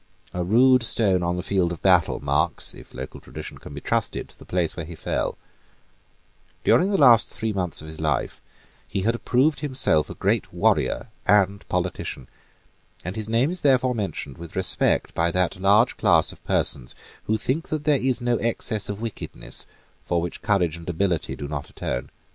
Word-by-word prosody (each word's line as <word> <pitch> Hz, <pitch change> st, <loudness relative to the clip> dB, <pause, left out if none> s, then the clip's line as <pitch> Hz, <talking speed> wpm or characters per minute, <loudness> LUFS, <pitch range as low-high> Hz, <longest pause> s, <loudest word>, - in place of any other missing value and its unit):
A 90 Hz, -, -2 dB
rude 125 Hz, +7 st, +5 dB
stone 100 Hz, -5 st, +3 dB
on 85 Hz, 0 st, -1 dB
the 90 Hz, -, -3 dB
field 95 Hz, -3 st, +1 dB
of 85 Hz, -, -7 dB
battle 90 Hz, -3 st, +4 dB
marks, -, -, +1 dB
if -, -, -14 dB
local 65 Hz, +1 st, -7 dB
tradition -, -, -9 dB
can -, -, -11 dB
be -, -, -7 dB
trusted, -, -, -2 dB
the -, -, -13 dB
place 90 Hz, -3 st, -1 dB
where 80 Hz, -, -5 dB
he 85 Hz, +2 st, -9 dB
fell, -, -, -2 dB, 1.3 s
During 185 Hz, -, +4 dB
the 200 Hz, -, +1 dB
last 120 Hz, -, +7 dB
three 110 Hz, -3 st, -3 dB
months 90 Hz, -5 st, 0 dB
of -, -, -10 dB
his 80 Hz, 0 st, -8 dB
life 75 Hz, -5 st, -1 dB, 0.5 s
he 95 Hz, -, -2 dB
had 115 Hz, +4 st, +1 dB
approved 130 Hz, +5 st, +1 dB
himself 130 Hz, -, +1 dB
a -, -, -7 dB
great -, -, 0 dB
warrior -, -, +1 dB, 0.2 s
and 100 Hz, -1 st, +2 dB
politician; 90 Hz, -7 st, -3 dB, 0.8 s
and 90 Hz, +2 st, -4 dB
his 110 Hz, -1 st, -3 dB
name 120 Hz, +7 st, +2 dB
is 180 Hz, -, -3 dB
therefore 130 Hz, -2 st, +3 dB
mentioned 95 Hz, -, -4 dB
with 85 Hz, -1 st, -10 dB
respect -, -, +1 dB
by 85 Hz, +1 st, +1 dB
that 90 Hz, +1 st, -1 dB
large 105 Hz, +5 st, +4 dB
class -, -, +4 dB
of -, -, -16 dB
persons 65 Hz, -4 st, +1 dB, 0.3 s
who 110 Hz, -, +1 dB
think 135 Hz, +9 st, -1 dB
that 155 Hz, -1 st, -2 dB
there 150 Hz, -2 st, +3 dB
is 130 Hz, -1 st, +1 dB
no 120 Hz, -1 st, +1 dB
excess 110 Hz, -2 st, -1 dB
of 100 Hz, +1 st, -5 dB
wickedness 115 Hz, -3 st, -4 dB, 0.4 s
for 85 Hz, -, 0 dB
which 85 Hz, +1 st, -5 dB
courage 90 Hz, -6 st, +1 dB
and 85 Hz, +1 st, -8 dB
ability 90 Hz, -1 st, -1 dB
do 70 Hz, -, -6 dB
not 70 Hz, -1 st, -5 dB
atone. -, -, -4 dB
100 Hz, 185 wpm, -24 LUFS, 85-120 Hz, 1.3 s, last